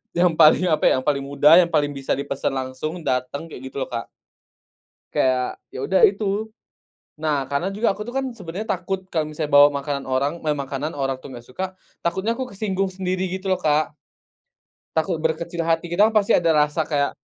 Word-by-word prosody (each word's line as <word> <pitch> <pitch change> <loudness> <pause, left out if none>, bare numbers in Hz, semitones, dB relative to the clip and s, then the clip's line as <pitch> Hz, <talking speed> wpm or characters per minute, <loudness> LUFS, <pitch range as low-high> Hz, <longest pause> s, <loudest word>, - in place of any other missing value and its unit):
yang 175 0 +4
paling 155 +3 +7
apa, 155 - +1
ya, - - +5
yang - - -7
paling 140 -2 +1
mudah, 140 +3 +4
yang 170 -1 +2
paling 145 -1 +2
bisa 135 -1 -5
dipesen 140 0 -2
langsung, 130 +6 -4
dateng, 130 +5 -2
kaya - - -8
gitu 130 +1 -5
loh - - -7
Kak. 115 -1 -4 1.0
Kayak, 130 -1 +1
ya 130 - -6
udah 190 - +2
itu. 205 +2 -2 0.7
Nah, 150 -3 0
karena 140 +7 0
juga 215 +1 +1
aku 210 +2 -7
tuh 240 - -7
kan, 265 -1 -1
sebenernya 195 -2 -6
takut 190 -1 -3
kalo 160 -2 0
misalnya 150 -1 -3
bawa 145 0 +8
makanan 140 0 -3
orang 130 +2 0
meh 155 -2 -1
makanan 140 +2 -4
orang, 135 -2 -2
tuh, - - -11
nggak 120 - -9
suka, 185 +9 -3 0.4
takutnya 190 +6 -1
aku 260 - -2
kesinggung 195 -1 -1
sendiri, 185 0 -2
gitu 190 +1 -4
loh 185 - +2
Kak. 155 -1 +2 1.0
Takut 165 +2 0
berkecil 165 +2 -2
hati, 165 +1 0
kita 205 +6 +4
pasti 210 -2 +4
ada 170 -2 +2
rasa 150 +1 +2
kayak 145 -2 0
160 Hz, 190 wpm, -22 LUFS, 140-185 Hz, 1.0 s, bawa